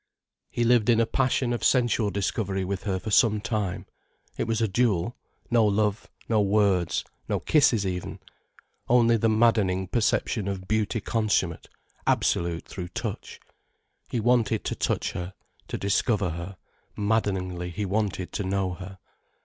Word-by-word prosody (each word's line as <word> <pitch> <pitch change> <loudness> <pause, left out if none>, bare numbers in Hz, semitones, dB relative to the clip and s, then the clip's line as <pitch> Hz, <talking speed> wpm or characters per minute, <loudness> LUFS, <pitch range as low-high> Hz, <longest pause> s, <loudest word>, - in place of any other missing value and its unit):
He 120 - -1
lived 120 -1 +3
in 115 -1 +5
a 115 - +4
passion 125 0 +1
of 120 - -3
sensual 120 -4 +3
discovery 95 0 -1
with 95 0 -4
her 95 -3 0
for 110 +3 -6
some 105 0 +4
time—it 105 -1 -5
was 115 -1 0
a 115 - +2
duel: 105 -1 +1 0.4
no 120 -1 +5
love, 105 0 +1 0.2
no 110 -2 +3
words, 100 -4 +2 0.3
no - - 0
kisses 120 -9 +3
even, 90 -2 -4 0.7
only 120 -1 +5
the 115 0 +2
maddening 110 -5 +2
perception 110 -1 0
of 95 -1 -4
beauty 110 +1 0
consummate, 105 -7 -1 0.4
absolute 85 -1 +1
through 90 -3 -6
touch. 90 - -6 0.7
He 120 - -1
wanted 115 -2 +2
to - - -2
touch - - -1
her, 90 +2 -6 0.3
to - - -4
discover 100 -1 +1
her, 85 +3 -7 0.4
maddeningly 95 -5 -1
he 95 +4 -3
wanted 100 -2 -2
to 105 - -2
know 95 -1 -1
her. 95 +2 -9
105 Hz, 145 wpm, -26 LUFS, 95-115 Hz, 0.7 s, in